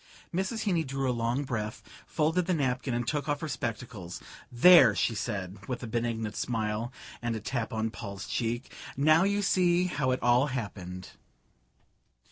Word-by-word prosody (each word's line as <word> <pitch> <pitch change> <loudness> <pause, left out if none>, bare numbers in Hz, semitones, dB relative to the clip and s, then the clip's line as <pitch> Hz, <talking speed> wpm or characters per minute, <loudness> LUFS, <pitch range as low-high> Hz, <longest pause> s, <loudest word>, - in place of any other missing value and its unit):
'" - - -26
Mrs. 190 +5 -1
Heeny 175 -6 +1
drew 135 -1 -2
a 125 - +2
long 120 +4 0
breath, 110 -5 -4 0.2
folded 160 +3 +1
the 180 - +2
paper 130 -2 -1
and 120 -1 -1
took 150 +1 -1
off 145 -1 0
her 160 - -3
spectacles. 115 - -5 0.3
"There," 125 - +8
she 115 - +1
said, 100 -4 -4
with 125 -1 -4
a - - -2
benignant 115 -2 -2
smile 110 0 -2 0.3
and 120 -1 -1
a - - -3
tap 115 +1 -3
on 110 0 -1
Paul's 100 -3 -7
cheek, 120 +1 -2 0.2
"now 155 +5 +5
you 200 +1 +1
see 180 -2 +3
how 150 -6 0
it 130 - 0
all 120 +3 +4
happened...." 95 -8 -5
125 Hz, 170 wpm, -29 LUFS, 110-150 Hz, 0.3 s, There